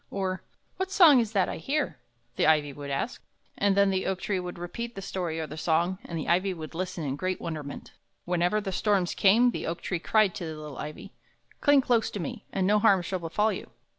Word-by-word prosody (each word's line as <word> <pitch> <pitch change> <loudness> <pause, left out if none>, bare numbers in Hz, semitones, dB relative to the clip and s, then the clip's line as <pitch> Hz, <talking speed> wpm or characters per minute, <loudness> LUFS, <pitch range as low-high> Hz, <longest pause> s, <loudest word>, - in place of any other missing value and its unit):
or 190 -1 -2 0.4
"What 380 0 -2
song 335 -9 +7
is 225 -3 0
that 195 -3 +3
I - - -4
hear?" 275 - -2 0.4
the - - +2
ivy 150 -2 +3
would 145 0 -7
ask; 140 - -3 0.3
and 200 -1 +2
then 200 -1 +5
the 190 0 -1
oak 190 -1 -1
tree 195 -3 -1
would 180 -1 -6
repeat 235 +7 -6
the 195 - -6
story 175 -4 -3
or 160 - -2
the 155 - -9
song, 170 +4 +1
and 170 - -5
the 155 - -4
ivy 185 +2 +2
would 155 -1 -8
listen 180 -1 -4
in 135 -2 -2
great 185 +4 -2
wonderment. 150 -4 -6 0.3
Whenever 180 +4 +1
the 200 -2 -4
storms 195 -2 +1
came, 230 +5 +5
the - - -4
oak 165 +1 -3
tree 180 - -2
cried 215 +1 +3
to 190 -5 -5
the 155 -1 -6
little 150 -3 -8
ivy: 150 0 -7 0.5
"Cling 285 -2 +5
close 235 -3 +2
to 205 - -6
me, 215 +5 -5
and 190 -1 0
no 210 +2 +4
harm 195 -4 +4
shall 185 +1 -3
befall 210 +6 0
you! - - -7
185 Hz, 225 wpm, -28 LUFS, 165-210 Hz, 0.5 s, song